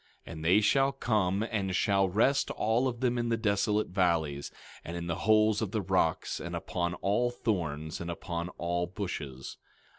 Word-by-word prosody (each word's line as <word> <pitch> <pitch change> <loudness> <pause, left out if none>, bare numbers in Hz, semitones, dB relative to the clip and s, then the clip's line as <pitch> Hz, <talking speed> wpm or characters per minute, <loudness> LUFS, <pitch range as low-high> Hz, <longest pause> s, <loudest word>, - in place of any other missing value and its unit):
17:19 - - -8
And 80 -1 -7
they 95 +6 +5
shall 135 +6 +3
come, 105 -6 +1
and 95 -4 -1
shall 100 -2 +2
rest 125 +9 +2
all 115 +4 +1
of 120 -1 -4
them 125 -1 +1
in 120 0 -1
the 115 - +1
desolate 105 -1 +1
valleys, 85 -6 0 0.3
and 85 +1 -5
in 85 - -4
the 85 -1 -1
holes 110 0 +4
of 110 - -1
the 110 +1 -1
rocks, 90 -3 0
and - - -5
upon 85 -1 -2
all 105 +7 +1
thorns, 80 -11 -3
and 85 - -5
upon 85 0 -4
all 85 0 -1
bushes. 75 -8 -6
95 Hz, 180 wpm, -30 LUFS, 85-110 Hz, 0.3 s, they